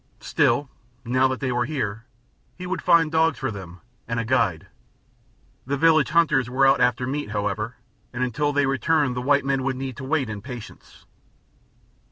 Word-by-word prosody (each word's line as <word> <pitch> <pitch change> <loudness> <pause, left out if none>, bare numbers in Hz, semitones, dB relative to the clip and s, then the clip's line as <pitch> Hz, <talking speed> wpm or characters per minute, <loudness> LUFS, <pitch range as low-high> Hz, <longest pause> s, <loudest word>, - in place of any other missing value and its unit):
Still, 145 - +1 0.4
now 130 +2 +3
that 130 0 -4
they 130 -2 -1
were 120 0 0
here, 115 -6 -4 0.5
he 180 - -7
would 185 +1 -3
find 165 -2 +4
dogs 160 -1 +2
for 130 -2 -3
them, 90 -3 -10 0.3
and 115 0 -2
a 115 - -2
guide. 110 -9 +1 1.0
The 140 +1 -1
village 155 -2 +4
hunters 150 -6 +2
were 135 +2 +2
out 135 - +4
after 125 0 +2
meat, 140 0 -3
however, 105 +3 -3 0.4
and 125 +1 -2
until 145 +4 0
they 145 -1 +2
returned 135 0 +1
the 125 - -2
white 140 +1 +2
men 135 -1 0
would 130 0 -1
need 130 -1 -5
to 135 - -7
wait 140 -1 0
in 105 -2 -6
patience. 120 -1 -11
130 Hz, 180 wpm, -24 LUFS, 120-145 Hz, 1.0 s, find